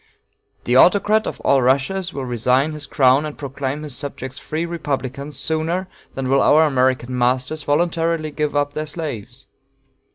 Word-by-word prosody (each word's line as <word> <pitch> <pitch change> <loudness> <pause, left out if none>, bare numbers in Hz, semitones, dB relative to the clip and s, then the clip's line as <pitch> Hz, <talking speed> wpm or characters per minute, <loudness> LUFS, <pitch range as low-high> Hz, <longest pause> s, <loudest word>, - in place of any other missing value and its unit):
The 120 - 0
Autocrat 205 +8 +4
of - - -5
all 140 - +3
the - - +2
Russias 140 +9 +1
will 135 -4 -5
resign 125 +4 +1
his 150 -2 -5
crown 130 +1 +3
and 150 -1 -6
proclaim 140 +1 -4
his 145 -4 -4
subjects 135 -2 -6
free 160 +2 -3
republicans 140 -4 -4
sooner 165 +4 -1 0.3
than 135 -1 -3
will 135 +1 +3
our 155 +2 +5
American 130 -3 +1
masters 125 +5 0
voluntarily 165 +1 0
give 150 0 -2
up 145 0 0
their 155 +1 -4
slaves. 135 -6 -6
145 Hz, 160 wpm, -20 LUFS, 130-155 Hz, 0.3 s, our